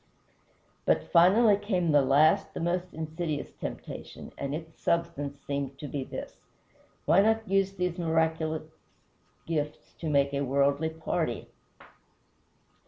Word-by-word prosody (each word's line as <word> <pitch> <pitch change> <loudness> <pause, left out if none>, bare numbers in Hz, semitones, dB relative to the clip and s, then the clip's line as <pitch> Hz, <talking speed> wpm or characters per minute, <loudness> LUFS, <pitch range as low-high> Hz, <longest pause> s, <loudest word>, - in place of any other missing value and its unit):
But - - +1
finally 200 +5 +6
came 185 -5 0
the 145 -1 +6
last, 150 +8 +3
the - - -3
most 175 +2 -1
insidious 160 -1 -4
temptation, - - -7
and 140 +1 -3
its 160 0 -9
substance 145 -4 -1
seemed 140 -1 -3
to 145 - -6
be 140 -1 -3
this: - - -7 0.7
"Why 190 - +5
not 220 +1 +2
use 195 0 +2
these 180 -2 -2
miraculous 160 -1 0 0.8
gifts 150 -2 -3
to 160 - -3
make 140 -1 +2
a 140 - 0
worldly 140 +3 +2
party? 160 0 -3
160 Hz, 125 wpm, -29 LUFS, 145-180 Hz, 0.8 s, finally